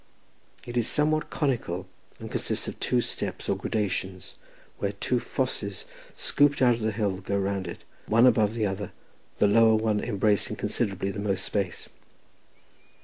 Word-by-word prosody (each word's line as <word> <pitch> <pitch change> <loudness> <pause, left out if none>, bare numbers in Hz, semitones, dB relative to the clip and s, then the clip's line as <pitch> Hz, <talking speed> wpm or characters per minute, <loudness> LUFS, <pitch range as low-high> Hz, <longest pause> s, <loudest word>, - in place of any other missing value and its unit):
It 120 0 -4
is 120 -1 +2
somewhat 155 +1 +1
conical, 115 - -1 0.3
and - - -8
consists - - -1
of - - -6
two 125 - +2
steps, - - -4
or - - +2
gradations, 95 -3 -3 0.5
where 100 0 -1
two 120 +5 0
fosses 120 -5 -2 0.3
scooped 145 0 +3
out 125 -2 +5
of 115 - -4
the 110 0 +1
hill 100 -3 -1
go 100 +1 -2
round 100 -1 -1
it, 85 - -8 0.2
one 115 +3 +5
above 110 -3 +4
the 110 -2 +1
other, 100 0 -3 0.4
the - - +4
lower 110 +2 +6
one 110 -1 +1
embracing 105 -2 +2
considerably 95 0 -1
the 100 - -6
most 100 -2 -1
space. 100 -4 -2
105 Hz, 155 wpm, -27 LUFS, 100-120 Hz, 0.5 s, lower